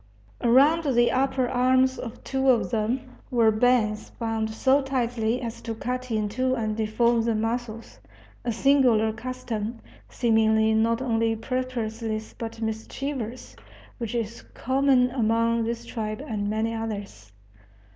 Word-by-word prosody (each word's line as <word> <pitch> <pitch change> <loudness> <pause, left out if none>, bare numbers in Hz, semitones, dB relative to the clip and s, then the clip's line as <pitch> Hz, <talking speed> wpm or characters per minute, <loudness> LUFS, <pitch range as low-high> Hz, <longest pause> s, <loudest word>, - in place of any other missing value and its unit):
Around 275 +4 +4
the 240 0 +4
upper 260 -1 +1
arms 260 +1 +2
of 235 -1 -8
two 265 0 0
of 245 -2 +3
them 230 +3 0 0.3
were 230 -3 +4
bands 215 -2 +2
bound 225 -1 -2
so 265 +5 +2
tightly 245 -3 -1
as 235 -2 -6
to 230 -1 -5
cut 250 +2 -4
into 225 +4 0
and 220 -3 -2
deform 225 +2 +2
the 230 0 0
muscles 225 +1 -3 0.4
a 240 - -1
singular 235 -3 +3
custom, 235 -2 -4 0.3
seemingly 220 -2 +3
not 230 +3 +2
only 225 -2 +1
purposeless 225 -2 -3
but 225 0 -6
mischievous, 225 - -5 0.4
which 230 0 -4
is 230 -1 -3
common 260 -1 +2
among 230 -1 +1
this 235 +1 -4
tribe 220 +1 -4
and 205 -3 -2
many 220 +2 -1
others. 205 - -6
230 Hz, 130 wpm, -25 LUFS, 220-255 Hz, 0.4 s, Around